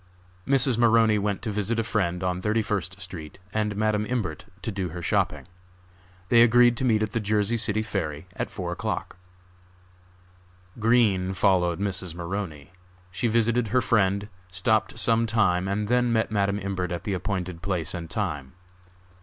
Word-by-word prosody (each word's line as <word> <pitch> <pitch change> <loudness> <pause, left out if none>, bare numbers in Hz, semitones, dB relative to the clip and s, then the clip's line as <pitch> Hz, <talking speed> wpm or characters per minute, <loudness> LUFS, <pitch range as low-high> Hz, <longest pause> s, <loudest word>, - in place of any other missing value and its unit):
Mrs. 130 -3 +3
Maroney 115 -2 +4
went 100 -1 -2
to 110 - -2
visit 105 +3 -1
a 115 - +1
friend 95 -5 -1
on 90 0 -1
Thirty 110 +2 +1
first 95 -2 -3
street 90 -5 -7 0.2
and 105 -1 0
Madam 105 0 +1
Imbert 95 -9 -3 0.2
to 115 - -2
do 95 -3 -3
her 90 +2 -7
shopping. - - 0 0.8
They 115 +1 +6
agreed 120 +1 +6
to 130 - -1
meet 110 -3 +3
at 110 - -2
the 115 - -1
Jersey 105 +1 +1
City 110 -1 0
ferry 80 -7 -3
at - - -3
four - - -5
o'clock. - - -4 1.6
Green 105 -5 +3
followed 90 -3 +2
Mrs. 95 -4 -3
Maroney. 85 -4 -5 0.4
She 105 +6 -1
visited 115 +1 +2
her 125 +5 +2
friend, 100 -4 +1 0.2
stopped 110 +5 +1
some 115 +1 +2
time 95 -5 +2
and 100 +2 -1
then 125 +1 +2
met 110 -2 +1
Madam 100 -1 +1
Imbert 95 -3 -3
at 85 - -4
the 100 - -2
appointed 90 -2 -3
place 90 -4 -1
and 85 -3 -6
time. 70 -5 -3
105 Hz, 160 wpm, -26 LUFS, 90-110 Hz, 1.6 s, They